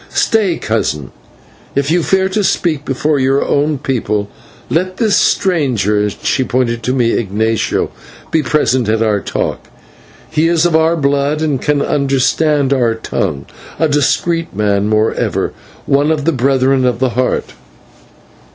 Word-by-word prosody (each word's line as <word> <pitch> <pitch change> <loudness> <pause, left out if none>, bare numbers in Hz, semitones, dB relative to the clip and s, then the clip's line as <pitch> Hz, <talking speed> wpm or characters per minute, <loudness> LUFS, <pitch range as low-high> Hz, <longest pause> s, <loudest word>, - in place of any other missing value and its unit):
"Stay, 205 -7 +1
cousin. 70 -2 -2 0.6
If 140 +2 0
you 175 +1 +3
fear 190 +3 +1
to 205 +2 -1
speak 155 -6 0
before 145 +2 0
our 135 +1 +2
own 145 +1 +1
people, 105 -6 -2 0.4
let 185 +3 -1
this 220 -3 +2
stranger 130 - +1
" - - +2
and 105 0 0
she 130 - +1
pointed 120 -2 -1
to 125 +3 -1
me, 120 -3 +2
Ignatio 110 +1 -1 0.4
"be 160 - +2
present 130 -4 +1
at 110 +1 +1
our 105 -2 +1
talk. - - -3 0.6
He 160 +1 +2
is 170 0 +2
of 170 -2 +2
our 160 +1 +3
blood, 145 +1 0
and 145 -5 -1
can 145 -1 +1
understand 140 +1 +1
our 120 -4 +1
tongue, 85 -10 -3 0.3
a 160 - +2
discreet 165 - 0
man, 100 0 +1
moreover, 110 +1 0 0.3
one 140 +2 +2
of 155 -3 0
the 165 - +3
Brethren 135 -1 +2
of 125 -2 +1
the 130 +1 +1
Heart." 125 +2 -1
135 Hz, 150 wpm, -15 LUFS, 115-155 Hz, 0.6 s, you